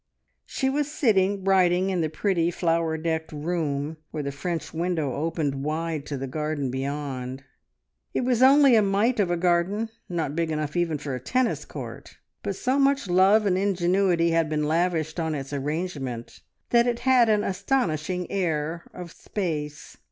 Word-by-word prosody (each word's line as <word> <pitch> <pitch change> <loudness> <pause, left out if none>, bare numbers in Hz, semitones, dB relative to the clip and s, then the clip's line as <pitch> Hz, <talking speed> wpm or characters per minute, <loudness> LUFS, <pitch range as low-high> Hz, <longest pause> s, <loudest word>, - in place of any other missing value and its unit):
She 265 - -1
was 290 +2 0
sitting 200 -8 +2
writing 185 -1 +3
in 180 -2 0
the 155 - 0
pretty, 170 +1 0
flower 165 -2 0
decked 160 0 -2
room, 155 -1 -2
where 150 -2 -4
the 140 - -3
French 165 +4 -4
window 165 -5 -1
opened 150 -3 -2
wide 155 0 -2
to 145 - -3
the 135 - -4
garden 145 -1 -2
beyond. 135 -1 -4 0.7
It - - -1
was 250 -1 +1
only 275 -1 +7
a 220 - +6
mite 210 +5 +1
of 195 -4 +2
a 175 - +1
garden, 180 +5 +1 0.2
not 165 -5 -2
big 165 -1 0
enough 155 -2 -2
for 175 - -1
even 165 -4 0
a 135 -3 -4
tennis 250 - 0
court, - - -9 0.2
but - - -3
so 270 -7 0
much 275 -4 +2
love 195 +4 +5
and 185 -2 +2
ingenuity 180 -2 +2
had 165 -1 +2
been 150 -1 0
lavished 165 0 0
on 160 -2 -1
its 140 0 -6
arrangement 140 -4 -4 0.3
that 235 0 +5
it 240 -1 -1
had 255 -3 +4
an 210 -1 +3
astonishing 180 - -1
air 165 -3 -2
of 175 -2 -8
space. 150 -8 -5
170 Hz, 165 wpm, -25 LUFS, 150-195 Hz, 0.7 s, only